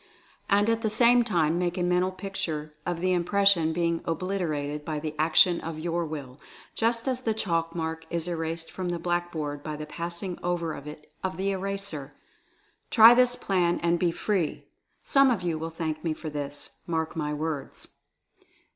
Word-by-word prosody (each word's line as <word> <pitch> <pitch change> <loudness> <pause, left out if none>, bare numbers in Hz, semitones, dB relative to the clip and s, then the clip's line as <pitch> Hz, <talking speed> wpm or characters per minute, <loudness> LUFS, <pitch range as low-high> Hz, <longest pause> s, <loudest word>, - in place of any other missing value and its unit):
And 205 +1 +4
at 230 0 +1
the 220 - +1
same 240 +2 +5
time 170 -6 +1
make 175 0 -1
a 180 - 0
Mental 180 +1 +2
Picture 165 -6 -4
of 175 -1 -2
the 185 0 +2
Impression 180 -2 +3
being 170 0 0
obliterated 160 -4 -2
by 155 0 -3
the 155 0 -4
action 165 +2 +5
of 160 -1 -5
your 170 +2 -1
Will, 140 -3 -7 0.3
just 230 +2 0
as 255 -1 0
the 225 -3 0
chalk 165 -5 -1
mark 160 -1 -3
is 170 0 -2
erased 165 -1 -3
from 185 -1 -4
the 175 - -1
blackboard 170 -4 -2
by 155 0 -5
the 150 0 -6
passing 170 +3 -5
over 170 -2 -1
it 150 +1 -10
of 190 -1 -2
the 195 +1 0
eraser. 195 -7 -4 0.7
Try 225 +1 +9
this 245 0 +4
plan 180 -5 +1
and 170 0 +2
be 175 - +3
Free! 175 -1 -1 0.4
Some 275 -1 +5
of 220 -7 0
you 165 -3 -1
will 165 +1 -3
thank 160 -1 -4
me 160 -2 -1
for 155 -1 -6
this, 145 -1 -6
mark 160 -1 -1
my 150 -2 -2
words. 150 -1 -5
170 Hz, 175 wpm, -27 LUFS, 155-190 Hz, 0.7 s, Try